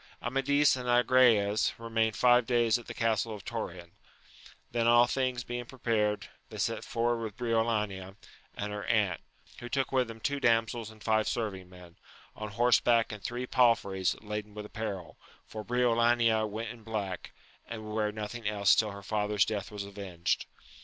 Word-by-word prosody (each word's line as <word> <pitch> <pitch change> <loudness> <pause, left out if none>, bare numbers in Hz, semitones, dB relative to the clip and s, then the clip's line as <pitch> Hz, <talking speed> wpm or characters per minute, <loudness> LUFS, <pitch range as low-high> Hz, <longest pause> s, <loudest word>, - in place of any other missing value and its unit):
Amadis 135 +4 +2
and 125 -1 -4
Agrayes 120 -4 +4
remained 115 -1 0
five 125 -1 +4
days 120 -2 +3
at 120 - -14
the - - -6
castle 115 -1 0
of 100 - -12
Torin; 90 -7 -5 0.8
then 115 -1 +1
all 120 +1 +7
things 125 -1 -1
being 120 0 -5
prepared, 110 -4 -1 0.2
they - - -9
set - - -1
for 120 0 0
ward - - -5
with 110 -2 -6
Briolania 110 -5 -1 0.4
and 105 0 -3
her 105 0 -4
aunt, 105 -7 +1 0.4
who 120 - -7
took 135 0 -1
with 130 -2 +2
them 115 -1 -9
two 140 +3 -1
damsels 115 -2 +1
and 110 -1 -15
five 110 -1 +2
serving 95 -6 -3
men, 90 -2 -15 0.4
on 105 0 -6
horseback 115 +1 +3
and 105 -2 -8
three 120 +1 -3
palfreys 115 -7 +2
laden 105 0 -5
with 105 0 -6
apparel, 105 -5 -6 0.3
for 110 -1 -7
Briolania 120 -2 +2
went 110 +2 -4
in 120 0 -10
black, 105 -5 -4 0.4
and 110 -1 -6
would 105 - -6
wear 105 -1 0
nothing 110 +1 -5
else 100 -2 +4
till 110 - +2
her 100 -1 -9
father's 105 0 +1
death 105 -3 -3
was 105 -1 -5
avenged. 100 -4 -3
110 Hz, 170 wpm, -30 LUFS, 105-120 Hz, 0.8 s, all